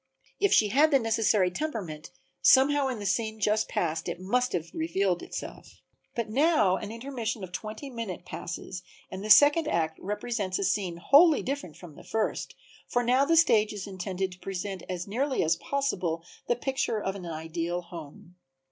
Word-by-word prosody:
If 400 0 +3
she 210 - +5
had 290 +8 +4
the 280 - +5
necessary 220 -5 +2
temperament 180 - -5 0.3
somehow 275 +1 +5
in 255 -3 -3
the 205 - -6
scene 220 +3 -1
just 210 +1 +1
past 165 -1 -1
it - - -5
must 245 +7 0
have 170 -1 -3
revealed 200 - 0
itself. - - -8 0.4
But 235 -2 -2
now 230 - +3
an 210 - -6
intermission 230 -3 -4
of 180 - -7
twenty 215 - -6
minutes 230 -8 -5
passes 180 +1 -6 0.3
and 190 +1 -6
the 215 - -5
second 290 +7 +7
act 160 -1 -1
represents 210 -1 -2
a - - -2
scene 185 -4 -1
wholly 290 - +5
different 270 - -4
from 175 -4 -12
the - - -14
first, 220 -1 -2 0.3
for 245 - 0
now 255 +3 +3
the 330 +2 +3
stage 220 -11 +4
is 205 -2 -6
intended 190 -1 -3
to 180 - -13
present 195 0 -5
as 180 0 -4
nearly 260 +6 0
as 165 +1 +2
possible 185 -12 -2 0.2
the 240 - +2
picture 265 -3 -1
of 195 -1 -3
an 180 -3 -7
ideal 165 +2 -3
home. 170 +1 -11
210 Hz, 175 wpm, -28 LUFS, 180-250 Hz, 0.4 s, second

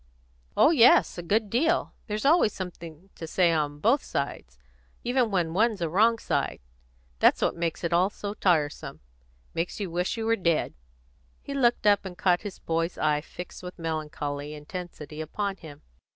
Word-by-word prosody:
"Oh 305 - +6
yes, 250 - +5
a - - -3
good 205 +4 0
deal. 325 +8 +1
There's 210 +1 -3
always 295 - +4
something 175 -1 -8
to 165 - -8
say 175 +1 +3
on 150 -2 -1
both 235 - +2
sides, 60 - -4 0.5
even 245 -1 +1
when 175 -5 0
one's 215 +2 +2
a 170 - 0
wrong 220 +7 +4
side. - - -2 0.6
That's - - +5
what - - +1
makes 170 0 -3
it 170 0 -1
all 180 +3 +4
so 205 0 -6
tiresome 160 -8 0 0.5
makes 170 +5 -3
you 195 -4 -3
wish 180 +6 -1
you 225 - -2
were 225 0 +3
dead." 170 -6 0 0.7
He 280 - -6
looked 240 -5 +2
up, 205 -1 +4
and 185 -2 -8
caught 180 -2 +2
his 205 -3 -7
boy's 165 +1 -2
eye 150 -1 +1
fixed 180 +3 -9
with 180 0 -8
melancholy 150 -3 -4
intensity 155 -1 -8
upon 195 +5 -3
him. 155 -4 -12
180 Hz, 170 wpm, -27 LUFS, 160-210 Hz, 0.7 s, Oh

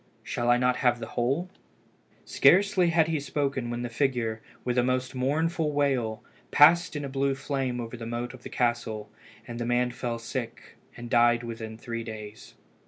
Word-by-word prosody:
shall 120 0 -2
I 120 - +6
not 125 0 +2
have 125 -2 +2
the 115 -1 -7
whole?" 135 +9 0 0.8
Scarcely 190 -2 +4
had 165 -1 +3
he 160 -2 0
spoken 140 -3 -2
when 120 0 -3
the - - -2
figure, 115 -3 -1 0.2
with 125 - 0
a - - +3
most 130 0 -1
mournful 150 +5 0
wail, 130 -7 0 0.3
passed 165 +3 +6
in 145 -1 -3
a - - -3
blue 135 0 0
flame 135 -2 -2
over 115 0 -5
the 115 -1 -7
moat 120 +2 -4
of 130 - -12
the - - -8
castle, 115 -3 -1 0.4
and 120 -1 -6
the - - -1
man 120 0 +1
fell 120 -1 -3
sick, 115 0 -6 0.2
and 120 0 -7
died 120 0 +4
within 115 -1 -6
three 115 0 -5
days. 110 -1 -9
125 Hz, 180 wpm, -27 LUFS, 120-140 Hz, 0.8 s, I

